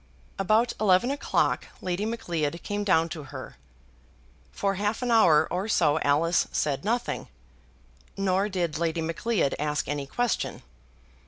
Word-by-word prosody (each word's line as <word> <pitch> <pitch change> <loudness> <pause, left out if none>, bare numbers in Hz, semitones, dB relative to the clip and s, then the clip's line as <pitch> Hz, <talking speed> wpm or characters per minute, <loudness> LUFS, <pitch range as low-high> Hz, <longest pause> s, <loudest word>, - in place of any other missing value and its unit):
About 215 +5 +2
eleven 210 +4 +3
o'clock 285 - 0
Lady 185 +4 -2
Macleod 170 -8 -2
came 205 0 -2
down 165 -5 +3
to 160 -4 -7
her. 130 - -9 0.9
For 200 -1 -1
half 210 +5 -1
an 245 - 0
hour 160 -9 +5
or 185 +4 -1
so 155 -7 +3
Alice 160 +4 +2
said 145 0 -1
nothing; 235 +4 -1 0.9
nor 195 +1 +1
did 175 -5 -2
Lady 165 0 0
Macleod 165 +1 0
ask 150 0 -1
any 145 -1 -3
question. 245 - -2
180 Hz, 135 wpm, -27 LUFS, 155-210 Hz, 0.9 s, hour